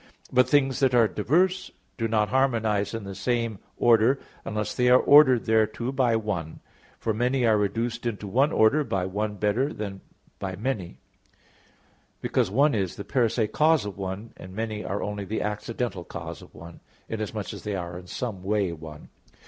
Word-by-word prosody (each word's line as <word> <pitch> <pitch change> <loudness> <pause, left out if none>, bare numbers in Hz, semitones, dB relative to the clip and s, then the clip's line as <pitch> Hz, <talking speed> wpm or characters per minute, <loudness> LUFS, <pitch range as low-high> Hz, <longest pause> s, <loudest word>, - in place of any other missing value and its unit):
But 125 0 +4
things 135 -2 +3
that 130 -3 +3
are 115 -2 +5
diverse 180 - +1 0.3
do 115 -3 -1
not 105 -1 +1
harmonize 115 -6 +1
in 115 - -5
the 100 0 -7
same 115 +1 -1 0.2
order, 120 +3 +4 0.3
unless 105 -1 -3
they 125 0 +2
are 125 - +8
ordered 140 -5 +6
thereto 110 +2 +1
by 125 -4 +2
one. 100 -8 -3 0.4
For 110 - -1
many 125 +3 +1
are 110 -1 +4
reduced 115 +4 -1
into 105 -3 -4
one 135 +9 +2
order 135 +6 +4
by 95 -9 -1
one 105 +3 -2
better 105 +8 0
than 100 -5 -6 0.4
by 95 -1 -4
many: 100 - -3 1.2
because - - 0
one 140 +8 +3
is 95 -5 -1
the 100 - -6
per 120 0 +2
se 110 -1 0
cause 155 +1 +3
of 100 - -5
one, 95 +3 -6
and 95 +1 -11
many 110 -1 -3
are 100 - -3
only 105 0 -4
the 110 +3 -3
accidental 105 -2 -3
cause - - -8
of - - -16
one, 85 0 -11 0.3
inasmuch 110 -2 -4
as - - -9
they 105 -2 -3
are 90 -1 -5
in 90 - -14
some 105 -2 -4
way 100 -1 0
one. 80 -2 -10
110 Hz, 180 wpm, -26 LUFS, 100-125 Hz, 1.2 s, are